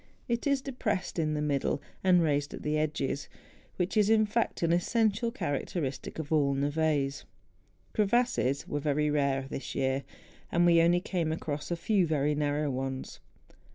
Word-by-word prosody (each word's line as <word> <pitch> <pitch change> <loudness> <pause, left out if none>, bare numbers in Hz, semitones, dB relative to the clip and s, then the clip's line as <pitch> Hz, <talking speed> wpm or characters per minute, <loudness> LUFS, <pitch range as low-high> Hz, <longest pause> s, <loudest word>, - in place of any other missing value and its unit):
It 235 +2 -1
is 280 -2 +1
depressed 215 -10 -2
in 155 -1 0
the 150 - -1
middle 145 -1 0 0.2
and 180 -2 +5
raised 145 -2 0
at - - -10
the 150 0 0
edges, 150 -2 -1 0.5
which 180 +3 -1
is, 210 -1 +4
in 220 -1 +5
fact, 215 -3 -1
an 170 0 +3
essential 220 +5 +1
character¬ 165 - -2
istic 135 +1 -6
of 160 -1 -5
all 140 -3 +3
neves. 145 0 0 0.7
Crevasses 210 - +1
were 145 - -2
very 150 0 +1
rare 140 -2 +1
this 135 - -6
year; 135 0 0 0.5
and 175 0 +3
we 170 -1 +6
only 175 +1 +4
came 175 -4 -1
across 150 -2 -4
a 175 - 0
few 185 +1 +1
very 150 -1 +1
narrow 145 0 0
ones. 130 0 -4
155 Hz, 165 wpm, -30 LUFS, 145-190 Hz, 0.7 s, we